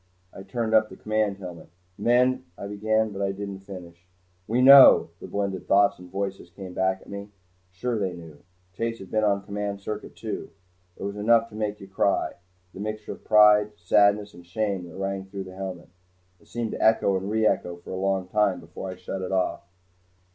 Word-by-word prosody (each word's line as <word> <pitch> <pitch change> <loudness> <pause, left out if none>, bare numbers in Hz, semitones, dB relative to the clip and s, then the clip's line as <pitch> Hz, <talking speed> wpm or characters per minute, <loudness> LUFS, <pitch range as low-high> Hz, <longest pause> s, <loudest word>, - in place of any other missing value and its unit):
I - - -9
turned 115 +2 -3
up 110 -1 +4
the - - -11
command 110 -2 -1
helmet. 90 -4 -9 0.3
"Men 125 +4 +2
" - - -39
I - - -7
began, 110 +2 0
but 100 0 -6
I 100 0 0
didn't 100 0 -6
finish. 90 -3 -11 0.4
"We 120 +3 +1
know," 135 -8 +9
the - - -9
blended 100 -2 -3
thoughts 100 -1 +4
and 90 0 -12
voices 95 -2 -4
came 95 0 -9
back 95 +1 0
at - - -18
me. 100 +1 -7 0.4
Sure 110 +5 -2
they 95 -3 -1
knew! 80 -4 -12 0.3
Chase 115 +2 -3
had 95 -3 -12
been 110 0 +1
on 100 -1 +2
command 100 0 -4
circuit 105 +2 -6
too. - - -5 0.5
It - - -8
was 100 +1 -4
enough 115 +2 +3
to 105 - -13
make 105 -1 -3
you 95 - -11
cry 95 +1 0 0.4
the - - -10
mixture 110 +1 -5
of - - -10
pride, 105 -1 +5
sadness 100 +3 +3
and 90 - -13
shame 95 0 -2
that - - -12
rang 95 0 -3
through 95 0 -6
the 95 -1 -11
helmet. 95 -2 -6 0.5
It - - -24
seemed 115 -1 -3
to - - -3
echo 110 -3 +4
and 95 +1 -3
reecho 105 -5 0
for - - -9
a - - -3
long 95 0 -1
time 100 -2 +1
before 85 +3 -8
I 90 - -6
shut 90 +1 -6
it 95 - -4
off. 95 -2 0
100 Hz, 205 wpm, -25 LUFS, 95-105 Hz, 0.5 s, know